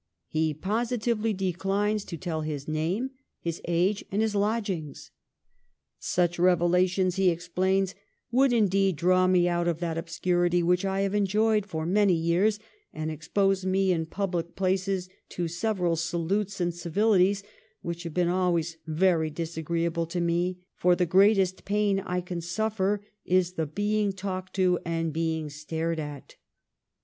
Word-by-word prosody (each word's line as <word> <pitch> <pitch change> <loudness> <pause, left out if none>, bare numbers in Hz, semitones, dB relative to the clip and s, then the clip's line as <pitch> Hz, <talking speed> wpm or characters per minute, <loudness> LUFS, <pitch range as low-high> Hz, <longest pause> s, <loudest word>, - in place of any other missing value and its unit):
He 155 -1 0
positively 225 - -1
declines 195 +2 -1
to 170 - -6
tell 160 -2 -3
his 150 -2 -4
name, 170 +12 -1 0.3
his 170 -1 -4
age, 180 +4 +1
and 200 - 0
his 220 -1 0
lodgings. 200 -8 -2 0.9
Such 175 -1 0
revelations, 180 +1 +3
he 190 -1 +4
explains, 185 +3 0 0.2
' - - -49
would 265 +2 +4
indeed 195 -5 +2
draw 185 +4 +3
me 180 -1 +4
out 175 0 0
of 170 -2 +1
that 165 -2 -2
obscurity 175 +1 +1
which 180 +2 +2
I 195 0 0
have 195 0 0
enjoyed 210 +1 +2
for 160 -4 -3
many 195 +1 +3
years, 170 +6 +2 0.3
and 155 0 -4
expose 195 +5 0
me 190 0 +2
in 165 -2 0
public 175 -2 -3
places 190 0 0 0.2
to 175 -1 -3
several 175 0 0
salutes 175 +5 -1
and 175 -1 0
civilities, 195 +3 +2 0.4
which 170 0 -4
have 170 -3 -6
been 180 -1 +2
always 170 -2 0
very 160 0 +2
disagreeable 165 +1 -2
to 175 +2 -3
me; 175 +1 -1
for 180 0 +3
the 180 - +1
greatest 190 +1 +3
pain 205 -1 +1
I 180 -1 -2
can 180 -1 -5
suffer, 205 +2 -1 0.2
is 180 -1 +2
the 160 -3 -2
being 205 +4 0
talked 185 -1 -5
to, 185 -2 +3
and 165 -1 -2
being 160 -1 -2
stared 160 +2 -3
at. 145 -3 -8
180 Hz, 150 wpm, -27 LUFS, 170-195 Hz, 0.9 s, he